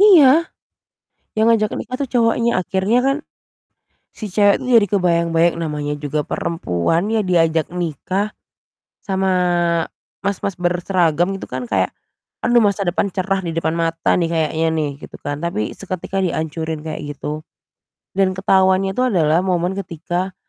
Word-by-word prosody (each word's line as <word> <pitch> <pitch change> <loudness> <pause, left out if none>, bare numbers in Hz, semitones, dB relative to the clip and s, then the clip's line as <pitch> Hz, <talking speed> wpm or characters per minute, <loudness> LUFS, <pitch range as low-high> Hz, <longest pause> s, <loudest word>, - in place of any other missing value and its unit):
Iya, 335 -6 +7 0.9
yang 220 - +4
ngajak 215 -2 +3
nikah 255 - -4
itu 280 - -1
cowoknya, 230 0 +2
akhirnya 190 +5 +1
kan, 275 +2 +1 1.0
si 215 -3 -6
cewek 205 +1 +4
itu - - -6
jadi 205 - +3
kebayang-bayang 170 -2 +2
namanya 150 -2 -3
juga 150 +1 -2
perempuan 165 - -1
ya 225 - +2
diajak 165 -3 +2
nikah 180 +5 -2 0.7
sama 190 -1 -1 1.0
mas-mas 200 -1 -2
berseragam 175 0 +1
gitu - - -7
kan, 125 -1 -4
kayak 95 -3 +1 0.5
aduh 240 0 +3
masa 200 -2 +1
depan 195 +3 0
cerah 190 +1 -1
di 165 - -3
depan 165 0 -1
mata 165 0 +1
nih 170 -2 +1
kayaknya 160 0 0
nih, 155 -2 0
gitu - - -10
kan, 145 0 -3
tapi 105 -11 -2
seketika 190 0 -3
diancurin 160 -2 -2
kayak 155 +1 -6 0.2
gitu. 150 +2 -5 0.7
Dan 190 -1 +1
ketahuannya 190 0 +3
itu 250 - -1
adalah 165 -8 +3
momen 180 0 +1
ketika, 175 +1 -3
180 Hz, 140 wpm, -19 LUFS, 160-200 Hz, 1.0 s, Iya